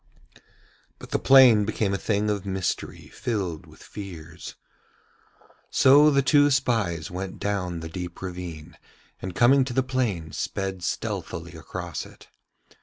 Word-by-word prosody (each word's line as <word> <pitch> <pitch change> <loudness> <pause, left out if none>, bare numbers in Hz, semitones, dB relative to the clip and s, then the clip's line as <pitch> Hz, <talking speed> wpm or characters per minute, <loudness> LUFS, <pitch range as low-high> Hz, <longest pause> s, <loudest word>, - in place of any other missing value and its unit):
But - - -12
the - - +1
plain 130 -6 +7
became 100 -1 -1
a - - 0
thing 105 0 0
of 100 -2 -2
mystery 95 -3 -4
filled 95 -9 -4
with - - -16
fears. 85 -5 -9 1.1
So 145 +3 +6
the 140 -2 +3
two 145 +2 +5
spies 110 - 0
went 95 +1 -5
down 90 -5 -2
the 80 - -6
deep 90 +1 -7
ravine, 90 -4 -7 0.4
and 95 -1 -6
coming 130 +5 +5
to 130 - -5
the 130 - +2
plain 115 -12 -2
sped 95 +1 -4
stealthily 85 0 -4
across 85 0 -6
it. - - -18
95 Hz, 135 wpm, -25 LUFS, 85-120 Hz, 1.1 s, plain